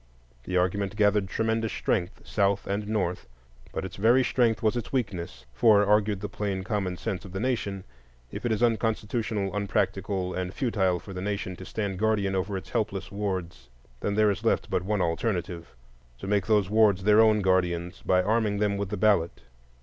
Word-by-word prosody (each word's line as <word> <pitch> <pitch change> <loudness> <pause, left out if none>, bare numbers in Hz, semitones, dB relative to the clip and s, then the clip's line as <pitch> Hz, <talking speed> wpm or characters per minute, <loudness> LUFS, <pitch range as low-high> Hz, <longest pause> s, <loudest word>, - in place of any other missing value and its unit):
The 90 - -1
argument 95 +2 0
gathered 105 -2 +2
tremendous 110 +2 -1
strength 90 -4 -2
South 100 -1 +1
and 100 +1 -2
North; 95 - -2 0.4
but - - -4
its 95 - -8
very 120 +6 +4
strength 120 -3 +1
was 110 +1 +2
its 120 -2 -4
weakness. 90 - -3
For, 105 - +5
argued 105 -1 +2
the 105 - -3
plain 100 -1 -3
common 95 -2 -2
sense 95 - -4
of 95 - -11
the 95 - -3
nation, 100 -6 -2 0.5
if - - -6
it 120 - 0
is 110 +2 +1
unconstitutional, 110 -3 0
unpractical, 100 -2 -1
and 90 0 -4
futile 95 -8 +1
for 100 - -10
the 90 - -5
nation 100 -2 -3
to 95 - -9
stand 100 -3 -3
guardian 105 -3 +1
over 95 +1 -1
its 95 - -9
helpless 100 -5 -2
wards, 95 -10 -4 0.3
then 100 - -2
there 105 -1 +4
is 100 +2 -5
left 115 - 0
but - - +1
one 100 0 0
alternative,—to 80 - -5
make 100 +1 0
those 105 -3 +3
wards 105 -2 +3
their 105 +2 +6
own 110 -1 +4
guardians 90 -2 0
by 90 0 +2
arming 110 0 +1
them 100 -1 +1
with 100 -1 -3
the - - -3
ballot. 90 - +2
100 Hz, 180 wpm, -27 LUFS, 95-110 Hz, 0.5 s, their